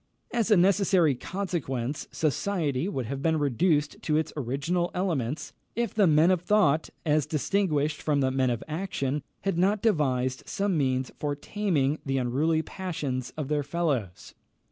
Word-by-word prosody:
As 235 -2 +1
a 210 - +6
necessary 185 -4 +4
consequence, 145 -5 -3
society 155 0 0
would 130 - -3
have 135 +4 -4
been 160 +1 +2
reduced 150 +2 +1
to 155 -1 +1
its 160 - -1
original 145 +7 -1
elements, 155 -6 -2 0.2
if 235 +1 -1
the 205 -4 +4
men 160 +3 +5
of 180 -3 +2
thought, 175 -6 +3 0.2
as 150 -2 +2
distinguished 155 -1 0
from 150 -2 +1
the 130 -1 +2
men 130 -1 +1
of 120 -2 -2
action, 155 -4 -2 0.2
had 195 -3 -1
not 200 +3 +2
devised 130 - +1
some 200 -2 0
means 130 -3 0
for 145 -1 -1
taming 155 -4 0
the 135 -1 -1
unruly 145 +6 +1
passions 145 -11 -4
of 150 -3 -3
their 150 0 +1
fellows. 140 - -2
155 Hz, 155 wpm, -27 LUFS, 135-180 Hz, 0.2 s, a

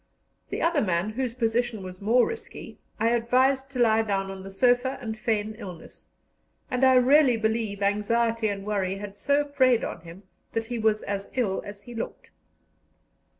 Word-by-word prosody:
The - - -3
other 335 -3 +2
man, 185 0 0
whose 245 0 -3
position 230 -3 -1
was 185 0 -9
more 235 +4 +4
risky, 460 +1 -8 0.2
I 225 +1 +3
advised 255 +3 +2
to 265 -2 -6
lie 225 -2 +4
down 195 -3 -1
on 190 0 -8
the 195 - -8
sofa 245 +6 +2
and 225 -4 -5
feign 215 -1 -1
illness; 180 -6 -10 0.6
and 250 +1 0
I 260 0 +6
really 255 0 +5
believe 220 -2 -1
anxiety 225 +3 +1
and 200 -1 -4
worry 195 -3 -1
had 200 0 -8
so 285 +7 +1
preyed 260 -4 +3
on 170 - -5
him 170 +4 -12 0.3
that 225 0 -1
he 240 0 -4
was 215 -1 +1
as 200 0 -4
ill 215 -7 0
as 205 0 -9
he 240 - -10
looked. 230 - -6
225 Hz, 175 wpm, -26 LUFS, 200-250 Hz, 0.6 s, I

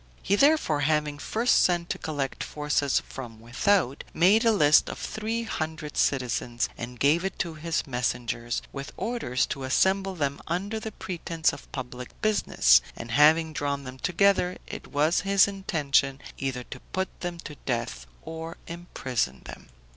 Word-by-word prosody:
He 200 - +2
therefore 280 - +3
having 150 0 +1
first 230 +10 +2
sent 175 -1 +1
to - - -3
collect 145 -4 -3
forces 150 -2 0
from 115 -4 -8
without, 130 - +1
made 195 +7 +5
a 230 - +5
list 155 -8 +5
of - - -6
three 225 +2 -3
hundred 155 -7 -4
citizens, 120 -2 0
and 125 0 -7
gave 155 +5 +3
it 195 - -3
to 170 -3 -2
his 160 +1 -2
messengers, 120 -2 -2
with 140 0 -6
orders 180 - 0
to 135 - -5
assemble 190 +8 +2
them 140 -4 -2
under 195 +6 -2
the 220 0 -6
pretense 165 -4 -1
of - - -11
public 125 -2 -7
business; 200 - +4
and 115 - -7
having 155 +4 +5
drawn 140 -1 -2
them 130 0 -9
together, 180 +1 +2
it - - -8
was 150 +4 +2
his 195 +1 +5
intention 145 -8 0 0.2
either 130 -2 -2
to - - -9
put 190 0 -4
them 175 -1 -4
to 150 - -8
death 115 - -2 0.2
or 165 +1 -7
imprison 130 - -3
them. - - -10
155 Hz, 155 wpm, -27 LUFS, 130-185 Hz, 0.2 s, made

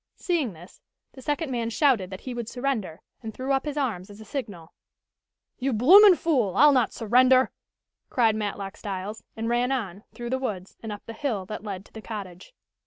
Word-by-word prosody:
Seeing 315 - -1
this 175 +3 -15 0.3
the 265 - -13
second 295 +2 -2
man 235 -2 -1
shouted 230 -7 +2
that 190 -1 -8
he 255 - -6
would 235 -2 -5
surrender, 245 -11 -3 0.2
and 225 -2 -6
threw 260 +2 -3
up 270 +1 +1
his 295 -1 -4
arms 215 -10 -2
as 205 +1 -12
a 220 - -11
signal. 200 - -6 0.9
"You 265 0 0
bloomin' 365 - +8
fool! 265 - +1
I'll 295 +3 +8
not 255 -5 +2
surrender!" 255 +3 +4 0.6
cried 225 -4 +3
Matlock 200 -2 -4
Styles, 205 +2 -5 0.2
and 225 0 -2
ran 240 +2 +1
on, 205 -7 -3
through 240 0 -6
the 260 - 0
woods, 200 -8 -5
and 225 - -6
up 205 - -8
the 230 - -7
hill 225 -7 -2
that 215 +2 -7
led 195 -2 -6
to - - -21
the 220 - -8
cottage. 200 - -8
230 Hz, 195 wpm, -26 LUFS, 205-265 Hz, 0.9 s, bloomin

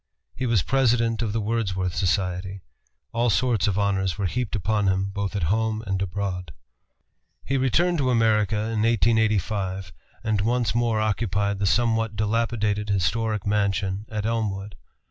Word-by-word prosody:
He 130 0 -3
was 115 -7 +2
President 115 -4 +2
of 110 -3 -1
the 115 - -1
Wordsworth 100 -5 -1
Society. 95 +1 -1 0.5
All 120 +1 +1
sorts 110 0 +2
of 100 -2 0
honors 95 -3 0
were 100 - -1
heaped 120 +5 -2
upon 105 +1 0
him, 95 +1 0
both 100 +1 -3
at 100 - -1
home 110 0 -1
and 95 -1 -2
abroad. 90 -3 -3 0.9
He 135 - -1
returned 160 +7 +2
to 130 -2 +1
America 110 -4 +2
in 110 +1 -1
1885, 105 -4 +1 0.3
and 110 -3 +1
once 120 +2 +1
more 115 -2 +1
occupied 100 -2 0
the 100 - +1
somewhat 115 +1 +1
dilapidated 105 -1 0
historic 105 +2 0
mansion 100 0 0
at 105 -1 -3
Elmwood. 105 -3 -2
105 Hz, 145 wpm, -24 LUFS, 100-115 Hz, 0.9 s, was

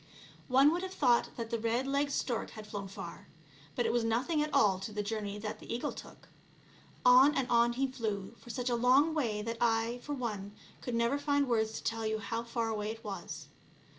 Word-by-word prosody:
One 270 +3 +6
would 350 - -1
have 375 0 -5
thought 245 -4 +3
that 230 -1 -5
the 230 - 0
red 230 +3 0
legged 280 +1 0
stork 240 -4 -1
had 215 -1 -9
flown 205 -2 -5
far, 185 -3 -9 0.5
but 245 - 0
it 225 - +1
was 240 -1 +2
nothing 250 +8 +1
at 300 0 -1
all 205 -9 +4
to 195 +3 -6
the 210 0 -2
journey 205 -1 -3
that 210 0 -5
the - - -9
eagle 235 +1 -2
took. - - -12 0.8
On 255 +4 +7
and 265 -2 0
on 235 0 +4
he 265 +3 +1
flew 220 -6 -3
for - - -15
such 245 +1 -2
a - - +2
long 260 +7 +4
way 225 -9 -1
that 230 +1 -3
I, 230 +1 +1
for 295 - -5
one, 210 -6 -4 0.3
could 245 - -3
never 235 +5 +1
find 285 -1 +1
words 220 -2 +1
to - - -6
tell 225 -1 -1
you 220 0 0
how 220 +2 -3
far 230 -1 -2
away 210 -1 -2
it 225 +1 -7
was. 200 -2 -6
235 Hz, 220 wpm, -32 LUFS, 220-260 Hz, 0.8 s, On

